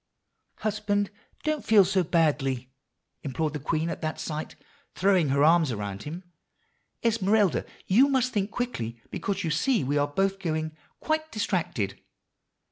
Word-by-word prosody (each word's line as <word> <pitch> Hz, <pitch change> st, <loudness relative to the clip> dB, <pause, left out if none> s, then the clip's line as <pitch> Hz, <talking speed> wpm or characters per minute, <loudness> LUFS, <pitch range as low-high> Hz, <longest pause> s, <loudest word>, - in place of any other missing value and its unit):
"'Husband, 205 Hz, -1 st, 0 dB, 0.3 s
don't 310 Hz, -2 st, -1 dB
feel 210 Hz, -3 st, +6 dB
so 190 Hz, 0 st, +2 dB
badly,' 145 Hz, -7 st, +1 dB, 0.5 s
implored 150 Hz, +2 st, -2 dB
the 150 Hz, -, -3 dB
poor 145 Hz, -, -18 dB
queen 160 Hz, 0 st, +1 dB
at -, -, -6 dB
that 155 Hz, -1 st, -3 dB
sight, 155 Hz, 0 st, -4 dB, 0.4 s
throwing 185 Hz, -5 st, +3 dB
her 140 Hz, +1 st, +3 dB
arms 160 Hz, -2 st, +5 dB
around 100 Hz, -2 st, -4 dB
him. 165 Hz, -, -7 dB, 0.8 s
'Esmeralda, 215 Hz, -4 st, +2 dB, 0.2 s
you 240 Hz, +9 st, +5 dB
must 260 Hz, -2 st, +1 dB
think 205 Hz, -2 st, 0 dB
quickly, 120 Hz, -, -3 dB
because 200 Hz, 0 st, -2 dB
you 160 Hz, -, -1 dB
see 220 Hz, -, +2 dB
we 145 Hz, +3 st, +1 dB
are 145 Hz, -, +2 dB
both 195 Hz, +6 st, 0 dB
going 155 Hz, -3 st, -2 dB, 0.3 s
quite 315 Hz, 0 st, -1 dB
distracted. 170 Hz, -, -2 dB
175 Hz, 145 wpm, -27 LUFS, 150-210 Hz, 0.8 s, feel